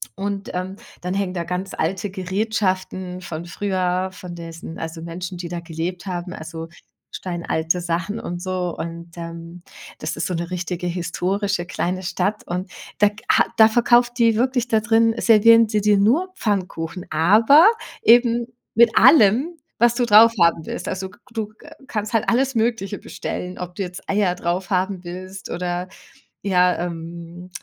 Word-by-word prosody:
Und, 200 Hz, 0 st, -4 dB
ähm, 185 Hz, +1 st, -4 dB, 0.3 s
dann 180 Hz, +1 st, -3 dB
hängen 195 Hz, -2 st, -1 dB
da 170 Hz, -, -2 dB
ganz 185 Hz, +2 st, -4 dB
alte 185 Hz, +5 st, -2 dB
Gerätschaften 185 Hz, -1 st, -2 dB
von 170 Hz, -1 st, -6 dB
früher, 185 Hz, 0 st, -1 dB
von 180 Hz, -1 st, -9 dB
diesen 165 Hz, -1 st, -8 dB
also, 160 Hz, 0 st, -6 dB
Menschen, 175 Hz, +2 st, -6 dB
die 175 Hz, -1 st, -5 dB
da 175 Hz, 0 st, -4 dB
gelebt 170 Hz, +3 st, -5 dB
haben, 180 Hz, 0 st, -4 dB
also, 160 Hz, +1 st, -7 dB, 0.5 s
steinalte 170 Hz, -1 st, -2 dB
Sachen 180 Hz, +5 st, -2 dB
und 175 Hz, 0 st, -5 dB
so. 180 Hz, -2 st, -2 dB
Und, 170 Hz, +1 st, -7 dB
ähm, 170 Hz, +1 st, -8 dB, 0.4 s
das 155 Hz, -, -3 dB
ist 160 Hz, -, -2 dB
so 180 Hz, -, -2 dB
'ne 170 Hz, +1 st, -3 dB
richtige 180 Hz, 0 st, -3 dB
historische 180 Hz, +2 st, -1 dB
kleine 180 Hz, +1 st, -2 dB
Stadt 195 Hz, +3 st, -2 dB
und 180 Hz, +2 st, -4 dB, 0.3 s
da 210 Hz, 0 st, +5 dB, 0.2 s
ha -, -, +5 dB
da 220 Hz, 0 st, +8 dB
verkauft 240 Hz, +1 st, +3 dB
die 230 Hz, -2 st, +4 dB
wirklich 250 Hz, +1 st, +1 dB
da 220 Hz, -2 st, +3 dB
drin 225 Hz, 0 st, +3 dB
servieren 230 Hz, 0 st, +6 dB
sie 210 Hz, -2 st, +1 dB
dir 210 Hz, -1 st, +4 dB
nur 320 Hz, -, +2 dB
Pfannkuchen, 185 Hz, -, -3 dB
aber 220 Hz, -, +6 dB, 0.3 s
eben 235 Hz, 0 st, +4 dB, 0.3 s
mit 235 Hz, 0 st, +4 dB
allem, 280 Hz, -, +5 dB, 0.2 s
was 240 Hz, 0 st, +4 dB
du 245 Hz, 0 st, +1 dB
draufhaben 210 Hz, -7 st, +5 dB
willst. -, -, -5 dB
Also, 190 Hz, 0 st, -3 dB, 0.2 s
du, 215 Hz, -2 st, -4 dB
äh, 300 Hz, -, -14 dB, 0.2 s
kannst 210 Hz, 0 st, -3 dB
halt 225 Hz, -, +1 dB
alles 265 Hz, +2 st, +1 dB
Mögliche 220 Hz, -3 st, 0 dB
bestellen, 180 Hz, 0 st, -6 dB
ob 180 Hz, 0 st, -6 dB
du 200 Hz, -, -2 dB
jetzt 180 Hz, 0 st, -9 dB
Eier 195 Hz, -3 st, +2 dB
draufhaben 185 Hz, +1 st, -1 dB
willst 185 Hz, +2 st, -8 dB
oder 175 Hz, +1 st, -3 dB, 0.6 s
ja, 180 Hz, -2 st, +3 dB
ähm, 170 Hz, +1 st, -7 dB
185 Hz, 155 wpm, -22 LUFS, 175-215 Hz, 0.6 s, da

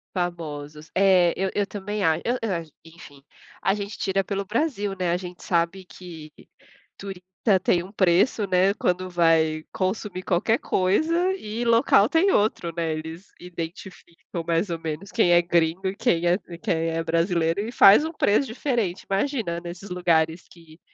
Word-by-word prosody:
Famosos, 155 Hz, -4 st, -5 dB
é, 185 Hz, -3 st, +4 dB
eu 190 Hz, 0 st, -1 dB
eu 205 Hz, -1 st, 0 dB
também 205 Hz, +1 st, -4 dB
acho, 160 Hz, 0 st, +2 dB
eu 245 Hz, +2 st, 0 dB
eu 225 Hz, -3 st, -2 dB
ach 165 Hz, -1 st, -5 dB, 0.2 s
enfim, 160 Hz, -4 st, -15 dB, 0.4 s
a 195 Hz, -, +2 dB
gente 205 Hz, 0 st, -6 dB
tira 195 Hz, 0 st, 0 dB
pelo 200 Hz, 0 st, -3 dB
Brasil, 210 Hz, -, -1 dB
né, 180 Hz, -2 st, 0 dB
a 175 Hz, -, +1 dB
gente 180 Hz, -1 st, -9 dB
sabe 175 Hz, +2 st, -1 dB
que 165 Hz, -4 st, -11 dB, 0.7 s
turista 195 Hz, -2 st, -8 dB, 0.4 s
tem 175 Hz, -1 st, +2 dB
um 185 Hz, -, -12 dB
preço, 200 Hz, +3 st, +2 dB
né, 185 Hz, +1 st, +3 dB
quando 185 Hz, -2 st, -1 dB
vai 165 Hz, -3 st, +2 dB
consumir 190 Hz, 0 st, -3 dB
qualquer 190 Hz, +6 st, +1 dB
coisa, 320 Hz, -, +1 dB
e 220 Hz, -, -5 dB
local 230 Hz, -2 st, +4 dB
tem 360 Hz, +5 st, +3 dB
outro, 205 Hz, -, 0 dB
né, 165 Hz, -2 st, -1 dB
eles 160 Hz, +4 st, -7 dB
identificam 170 Hz, 0 st, -8 dB
mais 170 Hz, +3 st, 0 dB
ou 165 Hz, -, -3 dB
menos 160 Hz, +4 st, -6 dB
quem 175 Hz, -, +3 dB
é 175 Hz, 0 st, +6 dB
gringo 170 Hz, +2 st, +1 dB
e 190 Hz, -, -3 dB
quem 170 Hz, -4 st, +1 dB
é 175 Hz, +2 st, +3 dB, 0.2 s
quem 165 Hz, -1 st, -1 dB
é 165 Hz, 0 st, -2 dB
brasileiro 165 Hz, +1 st, 0 dB
e 220 Hz, +3 st, -5 dB
faz 205 Hz, +2 st, +7 dB
um 320 Hz, -, -3 dB
preço 275 Hz, -3 st, +1 dB
diferente, 230 Hz, -6 st, -2 dB
imagina 200 Hz, -4 st, -1 dB
nesses 175 Hz, +3 st, -9 dB
lugares 170 Hz, -2 st, +1 dB
que, 165 Hz, -1 st, -18 dB
180 Hz, 165 wpm, -24 LUFS, 170-200 Hz, 0.7 s, faz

